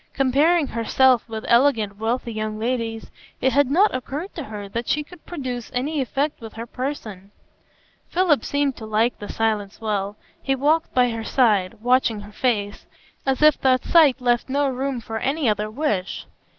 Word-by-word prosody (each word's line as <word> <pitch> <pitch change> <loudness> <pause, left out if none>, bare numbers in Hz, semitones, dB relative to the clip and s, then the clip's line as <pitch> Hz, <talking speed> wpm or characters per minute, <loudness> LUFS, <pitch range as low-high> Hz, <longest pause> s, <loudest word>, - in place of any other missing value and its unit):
Comparing 290 +5 +3
herself 245 0 +2
with 220 -1 -5
elegant, 235 -5 +3
wealthy 235 +1 -2
young 215 0 -3
ladies, 225 -1 -3 0.3
it 265 - +1
had 285 -2 +3
not 380 +9 +4
occurred 285 +8 -5
to 315 - -6
her 210 -2 -7
that 230 +4 -4
she 300 - +1
could 350 +2 -16
produce 255 -8 -5
any 285 +4 -1
effect 275 +3 -2
with 225 -1 -9
her 230 +1 -6
person. 230 -7 -6 0.8
Philip 340 -9 +2
seemed 285 -2 0
to 220 - -8
like 220 +3 +1
the 205 - -8
silence 215 -3 -1
well. 205 -2 -2 0.3
He 270 - 0
walked 305 +5 +1
by 250 -1 +4
her 225 -1 -4
side, 215 -6 +2
watching 245 -3 +2
her 205 +1 -12
face, 210 -3 -1 0.4
as 265 +2 +1
if 305 -2 +5
that 255 -1 +2
sight 300 -6 +5
left 245 0 +1
no 285 +1 +1
room 265 -1 -2
for 225 0 -5
any 280 +2 0
other 210 0 0
wish. 215 -7 -2
245 Hz, 175 wpm, -22 LUFS, 220-280 Hz, 0.8 s, if